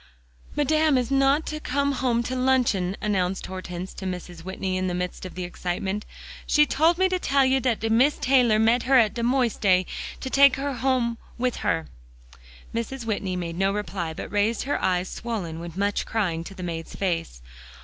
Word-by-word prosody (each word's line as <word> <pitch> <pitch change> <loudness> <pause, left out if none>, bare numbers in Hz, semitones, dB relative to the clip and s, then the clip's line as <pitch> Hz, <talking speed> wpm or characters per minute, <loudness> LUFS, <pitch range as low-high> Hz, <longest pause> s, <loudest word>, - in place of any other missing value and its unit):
"Madame 310 0 +3
is 250 +1 -1
not 275 +3 +3
to 305 - -4
come 280 0 0
home 250 -3 0
to 255 +2 -3
luncheon," 250 -8 +1
announced 190 -3 0
Hortense 185 -1 -6
to 190 - -8
Mrs. 180 -2 -6
Whitney 190 0 -3
in 185 0 -1
the 180 - -2
midst 180 +1 -4
of - - -13
the 185 - -4
excitement. 180 +3 -3 0.4
"She 300 0 +5
told 320 +4 +3
me 375 +1 +4
to 370 -1 -1
tell 275 -5 +3
you 265 +1 +3
that 245 -4 0
de 225 - 0
Mees 260 +6 +4
Taylor 250 -4 +4
met 225 +3 +3
her 270 - +7
at 220 -4 +4
de 235 - -4
modiste, 245 -1 +1
and 185 -2 +4 0.5
took 280 -1 +7
her 275 +1 -2
home 240 -2 0 0.2
with 250 0 -1
her." 165 -1 0 0.9
Mrs. 235 +2 -4
Whitney 200 -4 -2
made 170 -1 -4
no 195 0 +2
reply, 195 -5 -3
but 160 - -7
raised 205 +2 +1
her 285 - -1
eyes 180 0 +1
swollen 185 -10 -4
with 170 0 -8
much 200 +1 0
crying, 180 -7 -1
to 195 - -9
the 185 - -7
maid's 165 -2 -5
face. 165 - -2
220 Hz, 190 wpm, -25 LUFS, 185-260 Hz, 0.9 s, her